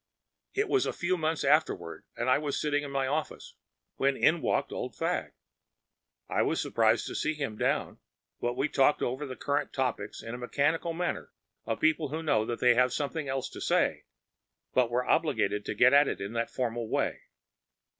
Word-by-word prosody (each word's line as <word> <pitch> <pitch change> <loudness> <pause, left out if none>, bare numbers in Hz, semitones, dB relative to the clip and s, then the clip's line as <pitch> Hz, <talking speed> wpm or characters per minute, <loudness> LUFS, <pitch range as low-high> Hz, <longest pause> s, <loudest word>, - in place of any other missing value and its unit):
It 415 +1 +1
was 400 -2 +2
a - - -2
few 180 +2 0
months 160 -2 -1
afterward, - - +1
and 120 - -2
I 130 +2 +4
was 145 -2 -2
sitting 145 -1 +1
in 145 - -5
my 135 -1 0
office 150 +4 -3 0.4
when 135 0 +2
in 165 +1 +3
walked - - 0
Old - - -5
Fagg. - - -2 0.9
I - - 0
was - - +1
surprised 115 0 +2
to - - -5
see 155 0 -1
him 140 -7 -3
down, - - -1 0.4
but 120 +1 -2
we 135 +3 +2
talked 145 0 +3
over 130 +4 -2
the 130 - -6
current 145 +2 -1
topics 130 -2 -2
in 115 - -6
that 120 - -6
mechanical 145 +6 0
manner 175 +1 -3 0.4
of 110 - -1
people 155 -1 +2
who 160 +3 -4
know 130 -8 +2
that 120 - -3
they 125 -1 +5
have 125 +1 +3
something 145 +2 -2
else 135 -1 -2
to - - -9
say, - - +1 0.7
but 125 -2 +3
are 125 +1 -1
obliged 110 -10 +1
to - - -2
get 125 +5 +5
at 140 0 +6
it - - -2
in 100 +3 -5
that 115 0 -1
formal 120 -2 -3
way. - - -1
135 Hz, 195 wpm, -29 LUFS, 120-155 Hz, 0.9 s, at